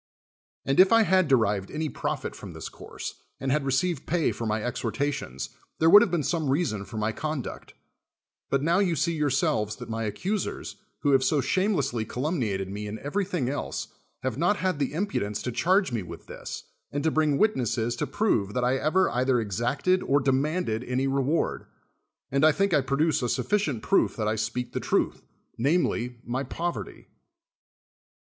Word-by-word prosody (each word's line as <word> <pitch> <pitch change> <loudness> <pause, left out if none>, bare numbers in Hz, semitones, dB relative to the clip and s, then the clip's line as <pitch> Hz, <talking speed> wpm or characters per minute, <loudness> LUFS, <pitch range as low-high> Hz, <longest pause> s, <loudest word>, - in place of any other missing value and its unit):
And 135 +3 +1
if 190 +1 +8
I 230 0 +6
had 185 -4 +3
derived 105 -7 +2
any 155 +1 -2
profit - - -3
from - - -9
this - - -7
course, - - -8 0.2
and 135 - -1
had 150 +1 +2
received 135 +3 0
pay 165 0 +2
for 115 - -4
my 110 0 -1
ex 120 - -3
hortations, 115 - -2 0.3
there 160 +1 +4
would 205 - +11
have 235 - +3
been 170 -3 0
some 160 -1 0
reason 130 - 0
for 110 - -8
my 110 +1 0
conduct: 150 +2 -5 0.7
but 140 0 +1
now 170 +4 +3
you 185 -4 +2
see 170 +2 +1
yourselves 130 -8 +1
that 125 -1 -8
my 115 0 -2
accusers, 185 - -3 0.2
who 145 - +2
have 135 -1 +4
so 150 +2 +2
shamelessly 140 - +1
calumni 130 - -1
ated 95 -1 -2
me 105 +2 -5
in 105 +1 -5
everything 180 - -2
else, 140 +3 -3 0.3
have 130 0 -2
not 175 +5 +3
had 185 -6 -1
the 140 - 0
impudence 130 - -1
to 125 - -2
charge 180 - +2
me 115 -3 -1
with 90 - -9
this, - - -7 0.3
and 145 0 -2
to 160 - +2
briug 150 -3 +2
>vitnesses 120 - +1
to 150 - -1
prove 120 - 0
that 125 - +1
I 125 +2 +2
ever 170 +7 +2
either 125 0 +2
exacted 120 - 0
or 140 +1 +2
demanded 135 -3 0
any 125 +2 -1
reward. 135 +4 0 0.6
And 140 +2 +2
I 155 - +7
think 195 +3 +1
I 145 - +5
produce 140 +4 +1
a 120 - 0
sufficient 155 - 0
proof 195 - +2
that 110 -2 -1
I 110 - +1
speak 115 +3 -3
the - - -1
truth, - - 0 0.4
namely, 125 -4 +1
my 125 +2 -2
poverty. 150 - -4
140 Hz, 185 wpm, -27 LUFS, 120-165 Hz, 0.7 s, would